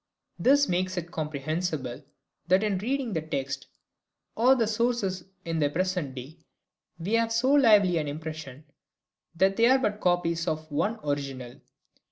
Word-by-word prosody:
This 285 +2 +4
makes 185 +1 -1
it 175 0 -4
comprehensible 155 -3 -3 0.4
that 185 +3 +4
in 205 -3 0
reading 250 +1 -2
the 160 - -1
text 140 -3 -4 0.7
or 250 +4 +5
the 235 -3 +2
scores 215 -3 -1 0.2
in 165 -1 -2
the 145 -2 +2
present 180 -4 -2
day 135 +6 -9 0.6
we 175 +6 -4
have 230 0 +2
so 245 +4 +2
lively 210 - +5
an 150 - -3
impression 155 -2 -7 0.7
that 190 +3 +2
they 230 +1 +5
are 260 +2 +6
but 210 -5 -2
copies 170 -2 +1
of 155 0 -3
one 210 +10 0
original. 135 -4 -4
175 Hz, 150 wpm, -27 LUFS, 155-215 Hz, 0.7 s, are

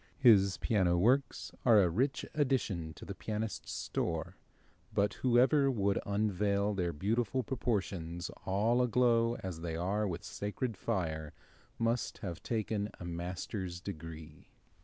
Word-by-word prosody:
His 100 -8 +6
piano 95 -5 +2
works 125 +7 +2
are 115 -4 +7
a - - +3
rich 130 - 0
addition 125 - 0
to - - -10
the - - -5
pianist's 110 0 -4
store, - - -2 0.6
but 100 0 +1
whoever 130 +3 +4
would 100 -6 +1
unveil 100 0 +1
their 90 -3 0
beautiful 110 - 0
proportions, 95 -9 -2
all 110 +6 +2
aglow 120 -1 +3
as 90 -4 -5
they 80 -1 -3
are 100 +5 0
with 90 +1 -4
sacred 105 +3 -3
fire, 80 -5 -2 0.4
must 115 +1 0
have 85 -3 -5
taken 110 -2 -1
a 90 - -7
master's 90 +1 -4
degree. 80 -4 -8
100 Hz, 130 wpm, -33 LUFS, 90-115 Hz, 0.6 s, are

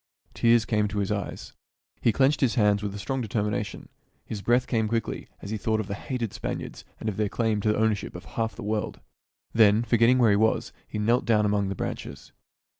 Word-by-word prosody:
Tears 115 -1 +4
came 105 -2 +1
to 105 0 -5
his 100 0 0
eyes. 100 -3 -4 0.5
He 115 - +4
clenched 135 +5 +2
his 130 -4 +2
hands 105 -3 +3
with 100 -1 -4
strong 130 +5 -2
determination. 105 -2 -2 0.4
His 105 -3 -5
breath 120 +4 +3
came 110 -3 0
quickly 115 0 -2 0.2
as 100 - -6
he 110 - -1
thought 110 +1 0
of 110 - -2
the 100 - -4
hated 115 +1 -4
Spaniards - - -5 0.2
and - - -5
of 105 - -2
their 105 -1 +1
claim 110 -2 0
to 105 - +2
the - - 0
ownership 110 -4 0
of 90 - -8
half 115 -1 -3
the - - -8
world. 105 0 -2 0.5
Then, 110 0 +5
forgetting 120 +1 +4
where 120 -4 +5
he 100 - +4
was, 110 +1 +1
he - - -5
knelt 115 +4 +2
down 110 -3 +3
among 100 -1 +1
the 100 - -3
branches. 70 - -6
110 Hz, 210 wpm, -26 LUFS, 105-115 Hz, 0.5 s, Then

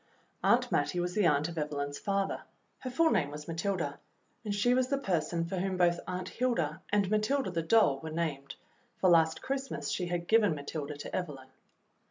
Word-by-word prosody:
Aunt - - +3
Mattie 180 - +1
was 175 0 -1
the 205 -3 +3
aunt 150 0 +2
of 170 -1 -5
Evelyn's 145 -1 -3
father. 195 -1 -1 0.4
Her 255 - -5
full 320 +6 +3
name 145 -6 +2
was 150 +1 -8
Matilda, 165 -3 -2 0.4
and 210 - -3
she 205 +5 +2
was 255 0 +2
the 275 +1 0
person 170 - -1
for 185 +3 -4
whom 190 0 -1
both 175 -1 +3
Aunt 180 0 -4
Hilda 180 -10 -1
and 200 -2 +3
Matilda, 215 +1 +1
the 165 -1 -1
doll, 165 -6 +4
were 160 - -6
named, 155 -4 -3 0.4
for 185 - +4
last 160 -1 +4
Christmas 270 0 -3
she 180 - -1
had 175 0 -3
given 215 -7 +4
Matilda 145 0 -5
to 145 - -6
Evelyn. 140 -7 -5
175 Hz, 190 wpm, -31 LUFS, 155-205 Hz, 0.4 s, doll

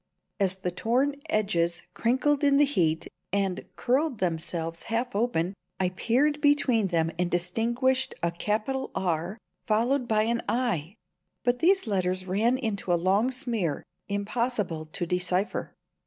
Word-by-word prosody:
As 190 -2 +1
the 185 -1 -3
torn 250 +9 +1
edges 170 -5 +1
crinkled 275 +5 +1
in 280 -1 +5
the 290 - +6
heat 165 - +1 0.2
and 195 -2 0
curled 265 +1 +1
themselves 165 -2 -2
half 235 +1 -1
open, 200 -5 0 0.3
I 185 -1 +2
peered 270 +10 +1
between 280 -7 +3
them 165 -2 +1
and 180 -1 +1
distinguished 235 +9 +1
a 170 - +2
capital 215 +9 -1
"R," 180 +1 -1 0.3
followed 240 +4 +2
by 215 -1 +3
an 235 +1 0
"i"; 215 - 0 0.5
but 245 0 +1
these 380 +6 +4
letters 185 -3 0
ran 220 +7 +2
into 215 -7 -2
a - - +5
long 195 +7 +2
smear, 235 - -1 0.3
impossible 200 -5 -1
to 175 +3 -3
decipher. 180 +3 -1
210 Hz, 140 wpm, -27 LUFS, 180-250 Hz, 0.5 s, the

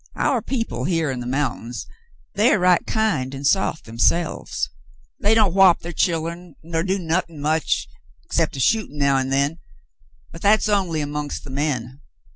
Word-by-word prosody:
Our - - +1
people 225 - -3
here 165 -4 0
on 130 - -4
the 120 - -5
mountain, 130 -3 -2 0.6
they're 215 +2 +4
right 180 -1 +4
kind 195 - 0
an' 135 - -7
soft 160 +1 +1
therselves. 115 - 0 0.5
They 210 +2 +3
don't 210 -6 +4
whop 190 -2 +6
ther 170 - -6
chillen, 170 0 -2
nor 165 0 -2
do 190 +3 0
nothin' 170 -2 -2
much 155 +2 0 0.4
'cept 165 -3 0
a - - -5
shootin' 210 - +1
now 140 -1 +3
an' 130 0 -1
then, 140 +4 0 0.7
but 165 - -11
that's 215 +2 +4
only 185 -7 +1
amongst 145 0 -4
the 140 - -9
men. 135 -2 -2
160 Hz, 160 wpm, -22 LUFS, 140-185 Hz, 0.7 s, whop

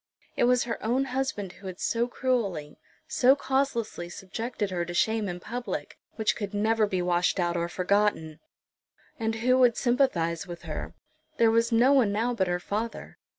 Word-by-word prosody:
It - - +3
was 250 0 +3
her 235 -1 -5
own 250 +5 +1
husband 255 -7 -2
who 190 +1 -11
had 185 -1 -7
so 235 +1 0
cruelly, 210 - -2 0.3
so 270 -4 +4
causelessly 265 -10 -1
subjected 205 +3 -4
her 175 -1 -1
to 175 0 -6
shame 220 +1 +1
in 175 0 -5
public, 240 +6 -5 0.2
which 220 -1 +1
could 205 -2 -5
never 215 +1 +2
be 185 -3 -1
washed 175 +2 +1
out 175 -1 0
or 170 0 -1
forgotten! 185 -5 0 0.8
And 225 0 -1
who 255 +1 +4
would 245 -3 +5
sympathise 200 - +1
with 175 -1 -8
her? - - -6 0.4
There 230 -1 +5
was 230 +1 +2
no 240 +4 +5
one 250 -7 +4
now 230 +4 0
but 190 -6 0
her 175 0 0
father. 215 +5 -5
220 Hz, 175 wpm, -27 LUFS, 180-245 Hz, 0.8 s, would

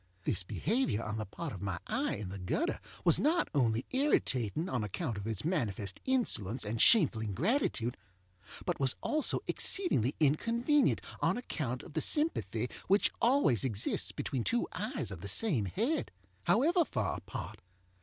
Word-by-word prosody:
This - - 0
behavior 115 - -1
on 110 -1 -4
the 110 -2 -4
part 160 - -6
of 95 - -8
my 100 -3 -2
eye - - -1
in 100 -2 -6
the 95 +1 -7
gutter 90 - -1 0.3
was 170 - +5
not 330 +5 +2
only 120 -4 +1
irritating 160 - +1
on 125 -11 -1
account 115 - -3
of 100 +1 -6
its 110 +3 -2
manifest 105 - -1
insolence 125 - +1
and 110 +2 -1
shameful 160 - +7
ingratitude, 120 - 0 0.7
but - - -1
was 135 -2 +2
also 305 -1 +2
exceedingly 145 - +2
inconvenient 235 - +2 0.2
on - - +1
account 135 - -4
of 160 - -12
the 160 - 0
sympathy 120 - 0 0.2
which 200 +3 +3
always 235 - +3
exists 110 -6 -1
between 130 -4 -3
two 95 - 0
eyes - - -3
of - - -7
the 100 - -6
same 135 - +2
head, 235 - -1 0.4
however 335 - +4
far 110 - -2
apart. - - -7
130 Hz, 155 wpm, -32 LUFS, -, 0.7 s, shameful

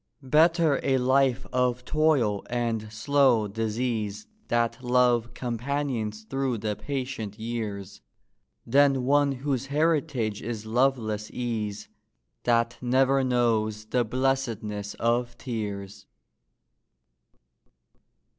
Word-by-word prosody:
Better 160 +2 +4
a 135 -1 +2
life 130 0 +2
of 125 -1 +1
toil 145 -10 +2
and 115 -3 -2
slow 125 -1 +3
disease 110 -1 -2 0.2
That 115 +1 0
Love 120 -1 +2
companions 120 -3 -3
through 135 +1 -2
the 105 0 -2
patient 125 -3 -4
years, 110 -4 -5 0.6
Than 135 +1 +4
one 145 +2 +3
whose 135 -1 -2
heritage 145 -7 0
is 110 -2 -5
loveless 110 -3 0
ease, 110 -4 -3 0.6
That 115 0 +2
never 135 +2 +3
knows 110 -4 +1
the 120 +2 +1
blessedness 115 -5 -2
of 120 +1 0
tears. 100 -5 -5
120 Hz, 95 wpm, -26 LUFS, 110-135 Hz, 0.6 s, Better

